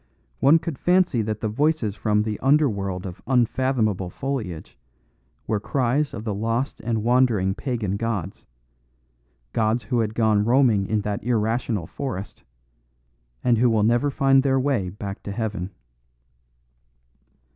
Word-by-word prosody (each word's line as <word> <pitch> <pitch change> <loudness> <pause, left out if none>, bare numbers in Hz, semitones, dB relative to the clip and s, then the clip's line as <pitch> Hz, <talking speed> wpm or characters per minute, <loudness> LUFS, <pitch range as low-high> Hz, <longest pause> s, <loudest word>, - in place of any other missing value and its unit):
One 150 +4 +6
could 165 -4 -5
fancy 180 -9 +3
that 110 0 -3
the 110 - 0
voices 135 -1 0
from 105 0 +1
the 105 -1 -3
under 145 +2 +4
world 100 -4 -3
of 90 -2 -8
unfathomable 120 -6 +1
foliage 110 - -5 0.7
were 110 - 0
cries 135 +6 0
of 105 - -6
the 110 -2 -2
lost 115 +6 -2
and 110 -1 -2
wandering 120 -6 +3
pagan 110 -5 -2
gods: 100 -5 -4 1.1
gods 110 +2 +1
who 125 -2 -1
had 110 -1 -1
gone 110 -2 +3
roaming 115 -4 +3
in 110 -1 0
that 100 0 -3
irrational 115 -4 0
forest, 110 - -6 1.0
and 120 -3 +3
who 125 +1 +4
will 110 -2 +2
never 120 +6 +2
find 135 0 +3
their 135 -1 +2
way 130 -9 0
back 100 +1 -7
to 100 - -6
heaven. 105 -4 -3
115 Hz, 140 wpm, -23 LUFS, 105-130 Hz, 1.1 s, One